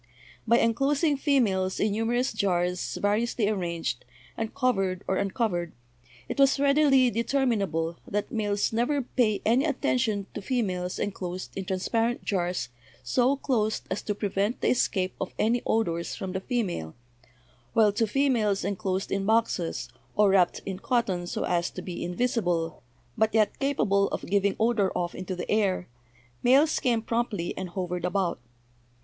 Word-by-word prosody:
By 235 +1 +5
enclosing 275 +7 +2
females 210 -10 +1
in 210 - +2
numerous 235 +4 0
jars 180 -4 0
vari 205 +2 +2
ously 235 -2 0
arranged, 170 - -2 0.3
and 225 -1 -3
covered 195 -9 0
or 190 - +1
uncovered, 195 -4 -1 0.5
it - - -5
was 275 0 +5
readily 280 -3 +4
determinable 205 - 0
that 205 0 -2
males 205 -3 0
never 250 +5 +1
pay 230 -4 0
any 240 +5 +4
attention 245 -8 0
to - - -5
fe 245 +4 0
males 180 -2 -3
enclosed 185 -2 -4
in 195 - -4
transparent 225 +6 0
jars 180 -5 -1 0.3
so 245 - +2
closed 220 -6 0
as 190 - -1
to 210 - -3
pre 205 0 -2
vent 200 +5 -1
the - - +2
escape 190 -6 +1
of 190 - -4
any 235 +2 +2
odors 170 -7 0
from 190 - -5
the 190 +1 -3
female, 190 - -2 0.8
while 215 -2 +5
to 225 +1 +1
females 220 -6 +1
enclosed 190 -1 -2
in 195 0 -1
boxes, 220 -6 +1 0.3
or 205 -2 +5
wrapped 180 -3 +3
in 190 -1 -4
cotton 195 -7 0
so - - -3
as 175 -1 0
to - - -8
be 175 -2 -5
invisible, 175 -4 -1 0.3
but 220 0 +1
yet 215 -1 +2
capable 205 -8 +2
of - - -4
giving 200 +1 +1
odor 220 -4 +2
off 175 -1 -2
into 185 0 -5
the 180 - -5
air, 200 -4 +1 0.5
males 280 +6 +4
came 235 -3 +1
promptly 230 -7 -2
and 185 -1 -5
hovered 180 -1 -3
about. 180 -3 0
205 Hz, 155 wpm, -27 LUFS, 185-240 Hz, 0.8 s, By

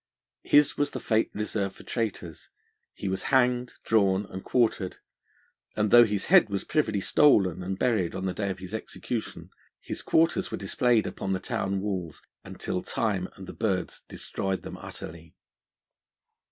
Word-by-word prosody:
His 145 -1 +4
was 145 0 +2
the - - -5
fate 110 -1 +1
reserved 105 -2 -2
for - - -13
traitors: 100 -8 -4 0.5
he 100 - -5
was 95 0 -1
hanged, 125 -1 +2
drawn, 100 -2 +2
and 95 - -6
quartered, 110 -6 +1 0.8
and 105 -1 +1
though 120 0 +9
his 105 -2 -2
head 110 - +6
was 100 -1 -2
privily 110 -10 0
stolen 95 - +4
and 95 +1 -3
buried 110 -8 +1
on 95 - -3
the 95 - -1
day 100 0 -2
of 95 -1 -4
execution, 110 +3 -5 0.3
his - - -5
quarters 165 +1 +2
were - - -4
displayed 115 +3 +2
upon 95 - -3
the 95 - -1
town 95 +1 -2
walls, 95 -6 -4 0.2
until 90 - -4
time 100 -5 -1
and 95 - -10
the - - -8
birds 95 -6 -2
destoyed 95 -1 -3
them - - -7
utterly. 85 0 -10
100 Hz, 155 wpm, -27 LUFS, 95-115 Hz, 0.8 s, though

